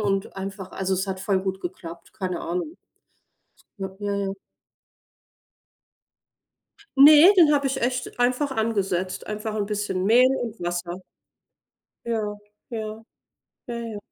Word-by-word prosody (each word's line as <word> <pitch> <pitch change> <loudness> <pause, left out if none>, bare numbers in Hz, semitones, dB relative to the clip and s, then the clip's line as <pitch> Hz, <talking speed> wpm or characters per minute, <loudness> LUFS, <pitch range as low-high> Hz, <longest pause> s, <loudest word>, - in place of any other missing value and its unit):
und 195 -2 -1
einfach 195 0 -6
also 190 0 -2
es 190 +2 -1
hat 190 -1 -3
voll 190 -2 +1
gut 190 0 -3
geklappt, 170 -1 -8
keine 185 -5 -3
Ahnung. 180 - -3 1.0
Ja, 190 -1 -4
ja, 205 0 -2
ja. 195 -1 -2 2.6
Ne, 300 +7 +9
den 330 -5 +7
habe 280 -1 +2
ich 270 -1 -1
echt 250 0 -2
einfach 255 +4 +1
angesetzt. 195 -6 -1
Einfach 215 +1 -4
'n 205 -1 0
bisschen 205 -3 -2
Mehl 245 +4 +6 0.2
und 230 -1 -6
Wasser. 175 +1 -4 1.0
Ja, 230 -1 0 0.5
ja. 220 -1 -5 0.6
Ja, 240 - -5
ja. 230 -3 -5
205 Hz, 125 wpm, -24 LUFS, 190-235 Hz, 2.6 s, Ne